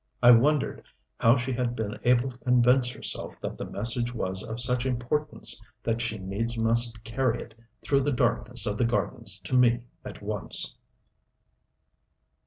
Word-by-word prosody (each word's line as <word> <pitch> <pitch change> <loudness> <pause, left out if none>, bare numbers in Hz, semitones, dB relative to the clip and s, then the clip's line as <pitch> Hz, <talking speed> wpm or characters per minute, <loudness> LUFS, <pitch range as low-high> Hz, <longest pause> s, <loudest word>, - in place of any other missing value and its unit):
I 120 - +9
wondered 140 +5 +2 0.4
how 115 +3 +4
she 130 +1 -3
had 120 -1 -2
been 110 -2 -4
able 125 +1 +2
to 125 - -17
convince 125 0 +3
herself 120 - -5
that - - -5
the - - -5
message 120 +3 +2
was 95 -3 -1
of 110 +2 -5
such 125 0 +3
importance 130 +1 0 0.2
that 115 0 -1
she 115 -2 -3
needs 105 +5 -4
must 115 0 +2
carry 120 0 -1
it 115 - -17 0.3
through 140 -1 +2
the 145 +2 0
darkness 125 -2 0
of 105 0 -3
the 120 - +3
gardens 115 -3 -2
to 95 - -8
me 120 -1 +3 0.2
at - - -10
once. - - +2
120 Hz, 160 wpm, -26 LUFS, 115-125 Hz, 0.4 s, I